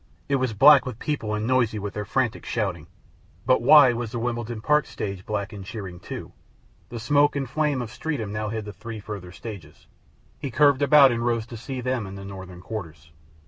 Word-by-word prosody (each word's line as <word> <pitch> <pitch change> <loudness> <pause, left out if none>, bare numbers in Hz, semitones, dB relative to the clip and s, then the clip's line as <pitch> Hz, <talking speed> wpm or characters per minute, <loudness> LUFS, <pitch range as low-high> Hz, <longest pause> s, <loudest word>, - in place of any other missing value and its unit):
It 140 - +2
was 130 -3 -1
black 140 +5 +7
with 125 -4 -5
people 115 -7 -2
and 105 +1 -2
noisy 120 -3 +2
with 105 0 -5
their 105 0 -4
frantic 125 -1 -1
shouting. 90 -8 -3 0.6
But 130 0 +3
why 130 0 +7
was 115 -2 -4
the 120 - -4
Wimbledon 120 -1 -3
Park 150 +7 +2
stage 100 -2 -5
black 105 0 -3
and 100 -2 -8
cheering, 95 -4 -7
too? - - -8 0.6
The 120 - -6
smoke 145 +6 +3
and 135 -2 -2
flame 145 -1 0
of 110 - -8
Streatham 115 -6 -4
now 105 0 -2
hid 110 -1 -4
the 105 - -7
three 115 -2 -8
further 100 -4 -8
stages. 100 -2 -10 0.5
He 140 - -4
curved 140 +2 +4
about 145 -2 +7
and 115 0 -2
rose 115 -2 0
to 120 - -10
see 125 +3 -6
them 125 -4 -2
and 95 +1 -8
the 100 - -8
northern 95 -2 -9
quarters. 80 -7 -8
115 Hz, 205 wpm, -25 LUFS, 105-130 Hz, 0.6 s, black